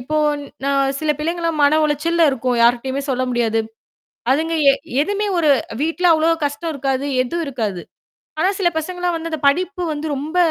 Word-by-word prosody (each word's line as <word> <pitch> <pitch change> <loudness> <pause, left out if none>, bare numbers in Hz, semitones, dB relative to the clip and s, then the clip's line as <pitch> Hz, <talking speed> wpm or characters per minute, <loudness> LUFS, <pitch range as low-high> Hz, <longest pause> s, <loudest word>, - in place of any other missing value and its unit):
இப்போ 305 +5 -3 0.5
ந - - -1 0.3
சில 310 -1 0
பிள்ளைங்கலாம் 330 0 -1
மன 290 +2 +4
உளைச்சல்ல 330 +3 +1
இருக்கும். 250 -1 -1
யார்ட்டயுமே 255 +3 +2
சொல்ல 255 0 0
முடியாது. 225 -2 +1 0.7
அதுங்க 320 +4 +1 0.2
எ - - +1 0.3
எதுவுமே 410 +5 -1
ஒரு 310 -3 +3 0.3
வீட்ல 330 +3 -1
அவ்வளோ 320 +1 +2 0.2
கஷ்டம் 320 +3 -3
இருக்காது, 270 -1 -2 0.2
எதுவும் 335 +7 -3
இருக்காது! 215 -9 -3 0.6
ஆனா, 365 - +3
சில 350 - +4
பசங்கலாம் 355 +2 -2
வந்து 330 0 -5
அந்த 315 - -3
படிப்பு 360 +5 -1
வந்து 300 +1 -4
ரொம்ப, 305 +5 -5
305 Hz, 160 wpm, -19 LUFS, 265-335 Hz, 0.7 s, மன